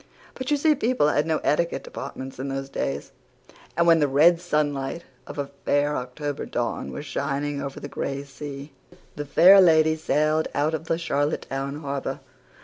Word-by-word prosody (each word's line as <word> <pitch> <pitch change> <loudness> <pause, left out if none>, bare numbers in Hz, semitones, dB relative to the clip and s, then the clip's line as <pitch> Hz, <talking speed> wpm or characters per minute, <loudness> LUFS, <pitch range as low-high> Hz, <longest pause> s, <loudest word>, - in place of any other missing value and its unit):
But 260 -1 -5
you 295 - +3
see 305 +2 +4
people 250 - +2
had 150 +1 +1
no 160 -1 +2
etiquette 170 +3 0
departments 130 0 -7
in 135 - -3
those 135 0 -4
days. 70 - -3 0.7
And 170 - +4
when 165 -1 +6
the 145 - +3
red 165 +5 +5
sunlight 150 -2 -1 0.2
of - - -8
a 140 -1 -3
fair 145 +1 +1
October 140 +3 -4
dawn 120 -1 -3
was 145 - -6
shining 140 0 -2
over 140 0 -5
the - - -6
gray 140 0 -4
sea 140 0 -8 0.4
The 145 - -4
Fair 185 +7 +7
Lady 160 -3 +5
sailed 155 0 +1
out 150 +2 +1
of 160 +1 -4
Charlottetown 145 -2 -2
harbour. 140 -2 -3
145 Hz, 165 wpm, -25 LUFS, 140-160 Hz, 0.7 s, Fair